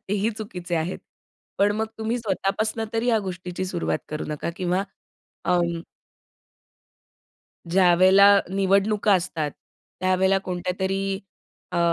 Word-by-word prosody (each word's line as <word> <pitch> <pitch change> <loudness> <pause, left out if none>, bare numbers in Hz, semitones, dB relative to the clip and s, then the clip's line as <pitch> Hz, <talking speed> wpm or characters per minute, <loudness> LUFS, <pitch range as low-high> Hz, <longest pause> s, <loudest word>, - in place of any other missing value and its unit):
तेही 205 +3 +1
चुकीचे 185 -5 -5
आहेत. 165 +3 -2 0.6
पण 205 +1 +4
मग 220 0 0
तुम्ही 225 +2 -1
स्वतःपासून 215 +1 -1
तरी 225 +2 0
या 230 -2 +4
गोष्टीची 180 -1 -5
सुरुवात 175 -4 -1
करू 150 0 -4
नका 150 +2 -3
किंवा 185 0 0 0.6
अं 170 -2 +1 1.9
ज्यावेळेला 190 +3 +6
निवडणुका 200 +2 +2
असतात, 165 -5 -1 0.5
त्यावेळेला 190 +1 +3
कोणत्यातरी 190 +2 -2 0.5
अ, 175 - 0
190 Hz, 105 wpm, -24 LUFS, 180-205 Hz, 1.9 s, ज्यावेळेला